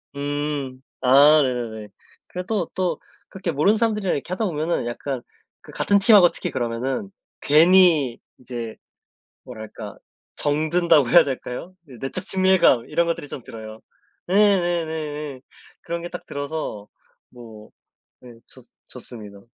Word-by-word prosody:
음. 145 -2 -3 0.2
아 145 +4 +6
네네네. 115 -4 -4 0.4
그래도 180 0 -3
또 185 -1 -1 0.3
그렇게 185 -3 -4
모르는 190 +10 +2
사람들이랑 210 -4 0
이렇게 145 +5 -6
하다 220 +3 -1
보면은 160 -6 -1
약간 130 +1 -4 0.4
그 - - -14
같은 200 0 +2
팀 210 +2 +6
하고 175 -4 +7
특히 - - -5
그러면은 130 - -3 0.3
괜히 160 -4 +5 0.2
이제 120 -3 -7 0.7
뭐랄까 110 -4 -9 0.4
정든다고 155 -2 +2
해야 170 -2 +7
될까요? 135 +6 -6
이제 130 -4 -13
내적 135 - -4
친밀감 185 -10 +3
이런 170 0 +1
것들이 165 -3 -3
좀 130 - -7
들어요. 110 -1 -10 0.5
네네네네. 160 -8 0 0.4
그런 170 0 -4
게 175 - -5
딱 - - -8
들어서 145 -8 -5 0.4
뭐 110 -3 -13 0.5
예 125 - -12 0.2
좋 130 - -16 0.3
좋습니다. 110 -5 -11
145 Hz, 285 characters per minute, -22 LUFS, 125-175 Hz, 0.7 s, 하고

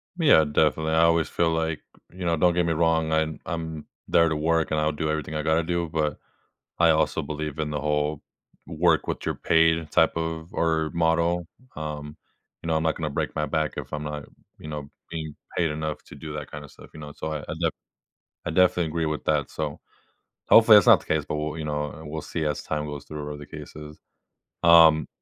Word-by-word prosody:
Yeah. 150 - +5
Definitely. 80 +1 +1
I 80 +1 +4
always 85 -1 +3
feel 85 - +1
like 80 -1 -1 0.3
you 90 0 -7
know, 85 -1 +1
don't 90 +2 +3
get 90 0 +1
me 85 - +1
wrong. 80 0 +1
I'm 80 0 0
I'm 80 -2 -5 0.2
there 85 0 +4
to 80 - -1
work, 80 +1 +1
and 80 - +1
I'll 75 0 +1
do 75 +1 -2
everything 75 0 -3
I 75 - -1
gotta 80 +1 +2
do. 85 0 -2
But 75 -3 -1 0.6
I 85 -1 +5
also 80 0 +2
believe 75 0 -5
in 75 -1 -1
the 75 - -2
whole 75 0 -1 0.4
work 80 +1 +1
what - - -4
your - - -1
paid 80 -1 +2
type 80 0 +3
of 80 0 -4
or 80 -1 +1
model. 85 +1 +1 0.3
Um, 75 -1 -6 0.4
you - - -7
know, 80 - +1
I'm 80 - +1
not 80 -1 +1
gonna 80 -2 -3
break 70 - -3
my 75 - 0
back 75 +1 -1
if - - -7
I'm 75 0 -3
not, 75 -1 -5 0.3
you - - -10
know, 75 -2 -6 0.2
being 80 -2 -6 0.2
paid 85 -3 +2
enough 75 0 -4
to - - -12
do 75 +2 -8
that 75 -2 -7
kinda 75 0 -8
stuff, - - -15
you 80 - -11
know, 75 -1 -9
so 80 - -5
I 75 - -3
I - - -6
def 85 -1 +1 0.7
I - - -2
definitely 90 0 +3
agree 80 +1 -2
with 75 -1 -3
that. 75 -2 0
So 75 -2 -4 0.7
hopefully, 110 -1 +9
that's 100 - +4
not - - +8
the - - -17
case, 80 -1 0
but - - -3
we'll, 75 +1 -3
you 80 - -4
know, 75 +1 -4
we'll 80 +1 -5
see 80 0 -4
as 75 -2 -1
time 75 -1 -3
goes 75 -1 -7
through 75 -1 -6
whether 75 0 -6
the 75 - -10
case 75 0 -10
is. 75 0 -10 0.7
Um 80 -2 +7
80 Hz, 220 wpm, -25 LUFS, 75-80 Hz, 0.7 s, hopefully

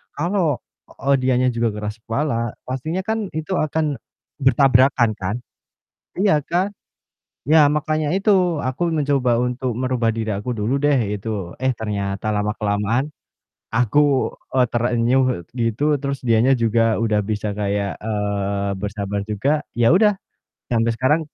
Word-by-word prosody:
kalau, 170 -1 +1 0.3
eee, 140 0 0
dianya 130 0 +2
juga 115 0 0
keras 105 +1 -5
kepala, 115 -1 -2
pastinya 155 +8 -3
kan 220 0 -2
itu 160 +4 -4
akan 155 -2 -1 0.4
bertabrakan 135 -3 +4
kan. 95 +3 -2 0.9
Iya 200 -6 +4
kan? 180 +5 0 0.8
Iya 155 +2 +6 0.2
makanya 155 0 0
itu 205 +2 +2 0.4
aku 130 +6 -4 0.2
mencoba 140 -4 +1
untuk 125 0 -2
merubah 125 -3 +1
diri 110 -1 -2
aku 105 +5 -5
dulu 105 +5 -1
deh 145 -1 +4 0.2
gitu, 100 -4 -5
eh, 130 - +3
ternyata 100 -1 -3
lama-kelamaan 105 +3 0 0.7
aku, 125 +4 +3 0.6
eee, 125 - +5
terenyuh 120 +2 +2 0.4
gitu, 115 +3 -1 0.2
terus 140 -1 -2
dianya 115 +3 +4
juga 115 0 +2
udah 105 -2 +2
bisa 105 0 -2
kayak, 100 -1 -2
eee, 100 -2 -2
bersabar 100 0 -3
juga, 105 +6 0 0.3
ya 120 +3 +4
udah 210 +3 +5 0.6
sampai 115 0 +2
sekarang. 145 +6 +2
120 Hz, 130 wpm, -21 LUFS, 105-140 Hz, 0.9 s, Iya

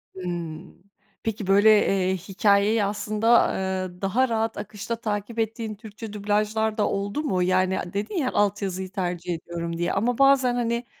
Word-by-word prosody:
Hımm. 175 -2 -6 0.5
Peki, 215 -3 -3
böyle, 200 +3 +6 0.2
eee, 190 -1 +1
hikâyeyi 200 +3 +2
aslında, 215 +3 +2
eee, 185 -1 -3
daha 240 +7 +1
rahat 225 0 -1
akışta 215 +2 -5
takip 220 0 -4
ettiğin 225 0 -2
Türkçe 215 0 -9
dublajlar 210 +1 0
da 210 - +2
oldu 200 +9 -2
mu? 185 -11 0
Yani, 185 +1 +2
dedin 210 - -3
ya, 265 -5 0
alt 205 0 +1
yazıyı 190 -1 -3
tercih 180 -2 -3
ediyorum 170 0 -5
diye 175 0 -1
ama 230 +4 0
bazen, 275 -3 +4
hani, 235 0 -1
205 Hz, 155 wpm, -25 LUFS, 185-225 Hz, 0.5 s, böyle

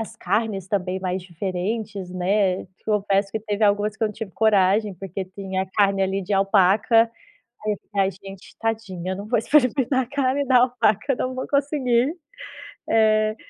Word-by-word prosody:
as 225 - -7
carnes 200 -1 -1
também, 185 -2 -1
mais 185 0 -2
diferentes, 190 +2 -4
né. 185 +1 0
Te 185 0 -28
confesso 200 -2 +1
que 220 - -2
teve 210 0 -3
algumas 205 +1 +1
que - - -6
eu - - +1
não - - -7
tive 225 -3 -6
coragem, 205 -1 +2
porque 190 +1 -6
tem 190 0 -6
a 190 - 0
carne, 195 0 +2
ali, 195 +1 -1
de 195 +3 -4
alpaca. 200 +4 +4 0.6
Aí 210 -1 0 0.2
tá, 200 -1 +2
a 190 - 0
gente: 195 0 -13
“Tadinha, 200 -5 -3
eu - - -4
não 200 +2 -7
vou 240 - +2
experimentar 260 +1 +2
a - - -18
carne 280 +1 0
da 255 -2 +5
alpaca. 245 0 +2
Não 255 +1 -3
vou 255 - -4
conseguir”. 280 -2 +1 0.7
Eh, 215 -1 +3
205 Hz, 180 wpm, -23 LUFS, 190-225 Hz, 0.7 s, da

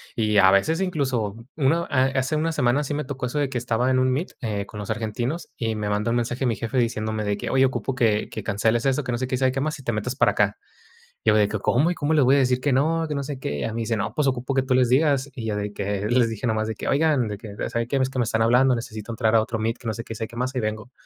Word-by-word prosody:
Y 105 -3 +1
a 95 -1 +7
veces, 155 - +2
incluso, 130 - -1 0.2
una 155 +3 +2
a 130 -1 +3
hace 135 +2 0
1 160 +2 0
semana 140 -2 +1
sí 145 +1 -3
me 150 - -2
tocó 130 -2 -4
eso 135 +5 -4
de 145 - +2
que 130 - -3
estaba 120 +2 0
en 130 - +3
un 130 0 +2
meet, 145 +8 -2
eh, 105 -5 -2
con 105 - -10
los 105 - -6
argentinos, 115 +8 -3
y 115 -2 -1
me 105 -1 -2
manda 105 +2 0
un 120 - +1
mensaje 120 +2 -1
mi 115 - +1
jefe 115 +4 -3
diciéndome 110 -2 -1
de 105 -1 -1
que: - - -4
"Oye 135 0 +4
ocupo 130 0 -2
que 110 -4 +1
que - - -5
canceles 110 +3 +1
eso, 135 +2 +1
que 125 - -3
no 120 - -1
sé 130 - -2
qué, 130 - -1
y - - -1
sabe 130 0 +2
que 135 +1 -2
más, 155 +2 -2
y - - -12
te 120 - -1
metas 115 +3 -3
para - - +4
acá". - - +1 0.7
Y - - +5
yo 105 - +4
de 105 -1 +4
que: 110 - -2
"¿Cómo? 140 +11 +2
¿Y - - -5
cómo 155 -1 -1
les 150 -4 +4
voy 135 +3 +5
a - - +3
decir 125 -2 +2
que 145 +1 +1
no? 160 +5 +2
Que 150 - -3
no 140 - -2
sé 140 -1 -5
qué". 75 - -4
Y - - -3
ya 110 - -2
me 115 - -3
dice: 115 0 -1
"No, 105 0 -3
pues 150 - +1
ocupo 130 0 -1
que 135 - +3
tú 130 -1 0
les 125 -1 +4
digas", 140 +1 +2
y 120 -5 -5
ya 110 - -1
de 105 0 -3
que 100 0 -2
les 120 0 +3
dije, 115 +1 -4
nomás 110 -1 0
de 110 - -3
que: - - -5
"Oigan, 145 -5 +2
de 105 -1 -5
que, 105 -1 -9 0.2
¿saben 115 0 -1
qué? 140 - 0
Es 130 -1 +1
que 130 - -5
me 120 - +3
están 115 0 0
hablando, 125 +3 +4
necesito 115 -1 -6
entrar 115 -1 +1
a - - +6
otro 110 0 -3
meet, 115 +1 -1
que - - -13
no 110 - -1
sé 115 - -5
qué, 115 - -7
sabe 110 - -3
qué 115 - -13
más, 130 +2 -2
hay - - +1
vengo". 110 +2 -4
125 Hz, 320 wpm, -24 LUFS, 110-135 Hz, 0.7 s, a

